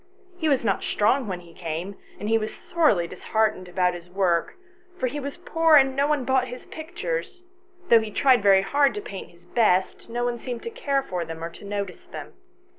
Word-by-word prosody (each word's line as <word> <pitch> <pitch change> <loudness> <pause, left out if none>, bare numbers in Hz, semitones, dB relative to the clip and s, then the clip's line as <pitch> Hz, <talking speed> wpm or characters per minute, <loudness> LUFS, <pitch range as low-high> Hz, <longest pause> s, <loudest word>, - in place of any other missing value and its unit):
He 320 -3 +1
was 265 -5 +2
not 195 -3 +1
strong 240 +4 +1
when 180 -3 -4
he 170 -1 -16
came, 170 +4 -5 0.2
and 205 - -4
he 225 +1 +3
was 215 0 -3
sorely 300 - +2
disheartened 200 +1 -1
about 180 0 +1
his 175 0 -9
work, 180 -3 +1 0.4
for - - -1
he 285 +4 -2
was 280 +2 -5
poor, 325 -2 +3
and 270 -2 +5
no 280 +1 +2
one 295 -4 0
bought 260 0 +2
his 250 +1 -8
pictures; 360 +5 -5 0.5
though 230 -1 +7
he 220 - -5
tried 250 0 +4 0.2
hard 280 - +2
to 415 - -3
paint 195 - -8
his 170 0 -22
very - - -25
best, 200 -3 +2
no 240 +1 -2
one 240 -1 -1
seemed 245 -1 -5
to 465 - -5
care 280 -10 0
for 180 -7 -3
them 165 0 -7
or 165 - -4
to - - -14
notice 200 -2 -4
them. - - -9
225 Hz, 210 wpm, -25 LUFS, 185-280 Hz, 0.5 s, though